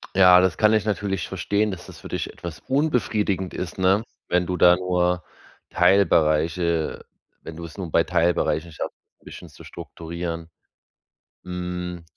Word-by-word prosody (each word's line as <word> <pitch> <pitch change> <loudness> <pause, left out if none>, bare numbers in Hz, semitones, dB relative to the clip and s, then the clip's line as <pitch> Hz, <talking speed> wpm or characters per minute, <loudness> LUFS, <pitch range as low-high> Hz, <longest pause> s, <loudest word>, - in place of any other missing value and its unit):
Ja, 90 -1 +7
das 95 -4 +1
kann 110 0 +4
ich 110 -1 +2
natürlich 100 -3 -2
verstehen, 100 +3 -1
dass 90 - -8
das - - -12
für - - -9
dich - - -4
etwas 85 -3 -8
unbefriedigend 110 - 0
ist, 90 +1 -5
ne? 95 +4 +3 0.2
Wenn 90 0 +1
du 90 0 -2
da 90 0 +7
nur 90 0 0 0.5
Teilbereiche 85 -3 +2 0.4
wenn 80 - -9
du 85 - -7
es 85 +3 -12
nur 90 -5 -5
bei - - +4
Teilbereichen 85 0 +1
schaffst, 75 - -6 0.3
'n - - -28
bisschen - - -11
zu - - -15
strukturieren. 85 0 -6 1.0
Hm, 90 -1 -5
90 Hz, 155 wpm, -23 LUFS, 85-95 Hz, 1.0 s, Ja